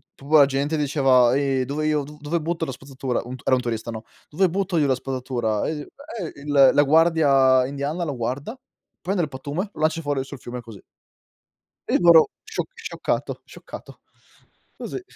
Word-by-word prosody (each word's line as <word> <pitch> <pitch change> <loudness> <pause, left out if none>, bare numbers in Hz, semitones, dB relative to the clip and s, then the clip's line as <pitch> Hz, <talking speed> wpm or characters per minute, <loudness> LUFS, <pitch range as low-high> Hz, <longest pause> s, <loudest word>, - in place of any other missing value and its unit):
pua 150 +2 +3
la 140 - +8
gente 140 +3 -1
diceva: 135 -4 +3
"Ehi, 135 -2 +1
dove 150 +3 -3
io 150 -2 +1
do 150 +2 -12
dove 155 +3 -2
butto 165 +1 -2
la 135 - -5
spazzatura?" 130 -1 -4
Un 125 +2 -7
t - - -17
era 130 - +4
un 125 - -1
turista, 115 -1 -4
no, 110 0 -7 0.3
"Dove 180 +4 +2
butto 190 -1 -1
io 145 -2 +3
la 130 - +2
spazzatura?", 125 -5 -2
e - - -1
i 150 - -5
e 230 - -8
il 140 -2 +5
la 145 0 +5
guardia 140 -4 +4
indiana 145 +5 -3
lo 145 -5 -3
guarda, 130 - -4 0.4
prende 185 0 -1
il 150 - -3
pattume, 145 +9 -4
lo 155 - -9
lancia 160 +1 +1
fuori 145 -3 -1
sul 135 -1 -10
fiume 120 +1 -7
così. 110 -4 -12 1.1
E - - +3
loro 170 -2 +7
scioc - - -4
scioccato, 460 0 -3
scioccato. - - -12 0.7
Così. - - -6
140 Hz, 185 wpm, -23 LUFS, 130-160 Hz, 1.1 s, la